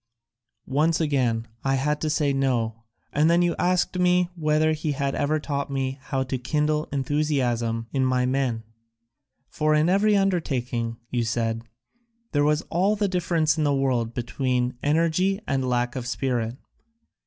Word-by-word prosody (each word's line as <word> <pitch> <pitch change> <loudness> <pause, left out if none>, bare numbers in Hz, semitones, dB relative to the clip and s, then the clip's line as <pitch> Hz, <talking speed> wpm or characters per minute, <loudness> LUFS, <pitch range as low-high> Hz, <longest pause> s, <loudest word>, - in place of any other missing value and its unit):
Once 155 +5 +1
again 125 -7 0 0.2
I 135 0 +1
had 150 +3 0
to 155 - 0
say 150 -2 +1
no 115 -4 -1 0.3
and 150 +3 +3
then 170 +1 +4
you 175 -1 +1
asked 180 0 +1 0.4
whether 155 -1 +2
he 155 -1 -1
had 140 -1 -1
ever 150 +2 0
taught 140 -2 -3
me 135 0 -2
how 135 -1 -2
to 130 0 -3
kindle 150 +4 0
enthusiasm 130 -5 0
in 135 -1 +1
my 130 -1 +2
men. 125 -3 0 0.8
For 155 0 +1
in 155 +3 +3
every 205 +2 +4
undertaking, 125 -11 -1
you 120 -1 0
said, 115 0 -1 0.7
there 145 -1 +2
was 150 +1 +2
all 190 +5 +2
the 205 -1 0
difference 165 -4 +1
in - - +2
the 145 -1 +2
world 125 -4 0
between 125 0 -1
energy 170 +6 +2
and 130 -2 -1
lack 120 0 0
of 125 -2 -4
spirit. 125 -2 -2
140 Hz, 155 wpm, -25 LUFS, 125-155 Hz, 0.8 s, then